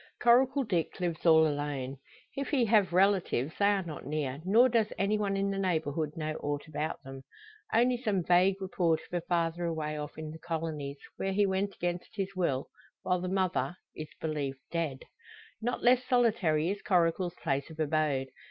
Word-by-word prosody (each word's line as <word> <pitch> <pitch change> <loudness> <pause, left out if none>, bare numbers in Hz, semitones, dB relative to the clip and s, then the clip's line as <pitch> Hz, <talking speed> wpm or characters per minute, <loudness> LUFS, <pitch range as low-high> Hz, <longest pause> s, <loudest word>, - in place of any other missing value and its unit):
Coracle 260 +3 +4
Dick 180 -8 -1
lives 175 -2 -2
all 160 -1 +7
alone. 145 -3 -2 0.4
If 275 0 -3
he 260 -5 +2
have 205 -5 +3
relatives 180 -7 +2
they 200 - +4
are 200 -2 +2
not 160 -4 -7
near, 145 -1 -3
nor 225 +7 +6
does 230 -3 +1
any 200 +2 +1
one 200 -2 0
in 195 0 0
the 195 - -2
neighbourhood 160 -4 -1
know 155 -1 -2
aught 145 0 -2
about 155 0 -4
them. 135 0 -9 0.5
Only 245 +2 +3
some 205 -7 0
vague 185 +3 +4
report 175 -4 +1
of - - -21
a 175 - 0
father 170 0 0
away 155 -2 -2
off 150 0 -7
in 155 -1 -6
the 160 - -10
colonies, 160 -4 -4 0.2
where 195 0 -1
he 205 +1 +3
went 195 +1 -1
against 175 +3 -4
his 195 -1 -3
will; 140 -8 0 0.4
while 180 -1 +1
the 185 - -2
mother 185 -1 0 0.2
is 155 - -6
believed 145 -4 -3
dead. 160 -6 -2 0.6
Not 240 +2 -2
less 250 +1 +5
solitary 210 -10 +2
is 200 - -5
Coracle's 175 -1 +1
place 140 -2 -2
of 160 0 -12
abode. 150 -3 0
175 Hz, 180 wpm, -30 LUFS, 155-195 Hz, 0.6 s, all